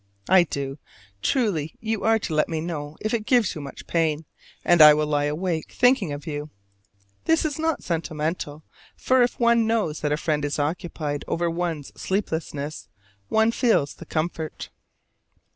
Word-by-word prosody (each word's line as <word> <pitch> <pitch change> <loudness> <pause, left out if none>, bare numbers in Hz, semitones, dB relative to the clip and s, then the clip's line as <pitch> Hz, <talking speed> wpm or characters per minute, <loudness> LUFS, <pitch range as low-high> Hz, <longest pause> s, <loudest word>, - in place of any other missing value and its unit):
I 185 -1 +6
do. 140 -2 -4 0.4
Truly, 170 - 0
you 220 -2 -2
are 225 0 +4
to 190 -6 -4
let 155 - +2
me 160 -2 -2
know 155 -2 -5
if 215 - -2
it 220 -2 -1
gives 240 -7 +3
you 155 - -6
much 140 -1 -9
pain, 160 -2 0 0.4
and 175 -2 +5
I 150 -1 +10
will 150 0 +1
lie 145 -1 +1
awake 160 +2 -2
thinking 245 - +3
of 145 +1 -6
you. 150 -1 -4 0.8
This 325 0 +3
is 300 -1 -2
not 320 -1 0
sentimental, 155 -2 -3 0.3
for 260 0 +2
if 245 0 +1
one 235 -1 +4
knows 215 -10 0
that 150 - -1
a 150 - +2
friend 150 -2 -1
is 145 0 -1
occupied 150 -1 -2
over 170 0 0
one's 165 -4 -3
sleeplessness 160 -6 -3 0.4
one 220 +1 +3
feels 225 - +2
the 170 - -12
comfort. 160 0 -3
165 Hz, 165 wpm, -24 LUFS, 150-220 Hz, 0.8 s, I